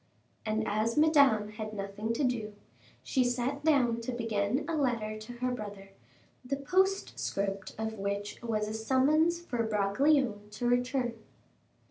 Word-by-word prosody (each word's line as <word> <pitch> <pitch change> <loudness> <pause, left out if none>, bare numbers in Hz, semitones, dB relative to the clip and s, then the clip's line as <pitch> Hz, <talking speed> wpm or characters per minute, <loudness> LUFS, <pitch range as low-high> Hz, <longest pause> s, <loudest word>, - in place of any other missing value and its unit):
And 220 0 0
as 215 +4 0
Madame 280 -9 +5
had 215 0 -6
nothing 200 +2 -3
to 260 - -1
do, 225 -5 -1 0.5
she 260 - +2
sat 250 +4 -1
down 250 -7 +3
to 230 - -3
begin 225 +1 -1
a 335 - -1
letter 235 -7 0
to 215 +3 -9
her 250 +1 -2
brother, 205 -4 -6 0.5
the 265 +2 -2
postscript 275 - -1
of 220 -1 -4
which 200 +1 -3
was 215 -3 -1
a 215 - -4
summons 285 +9 +3
for 240 -7 -1
Bragelonne 215 +1 +2
to 240 +3 -2
return. 245 0 +1
230 Hz, 140 wpm, -30 LUFS, 210-265 Hz, 0.5 s, Madame